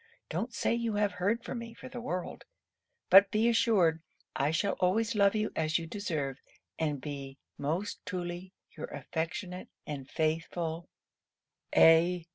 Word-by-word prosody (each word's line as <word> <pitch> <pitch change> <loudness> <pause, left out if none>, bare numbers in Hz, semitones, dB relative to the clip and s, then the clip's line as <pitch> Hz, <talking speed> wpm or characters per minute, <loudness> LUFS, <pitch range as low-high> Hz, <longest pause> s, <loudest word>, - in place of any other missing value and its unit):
Don't 245 - -2
say 230 - 0
you 235 -2 -1
have 205 -1 +2
heard 205 +6 0
from 245 - -4
me, 230 0 -8
for - - -10
the 245 -1 -7
world; 180 -6 -4 0.7
but 195 +1 +9
be 215 +3 +2
assured 215 -9 +3 0.3
I 140 - +1
shall 160 +6 +1
always 210 +5 +2
love 200 -1 +4
you 215 0 0
as 155 0 +1
you 165 - -4
deserve, 155 -7 -3 0.4
and 150 -3 0
be 140 -1 -7 0.2
most 165 +8 -3
truly 180 0 -5 0.2
your - - -5
affectionate 165 +5 -4 0.2
and 140 -3 -6
faithful, 165 +1 -2 0.9
A. 165 +1 +6
180 Hz, 145 wpm, -31 LUFS, 160-210 Hz, 0.9 s, but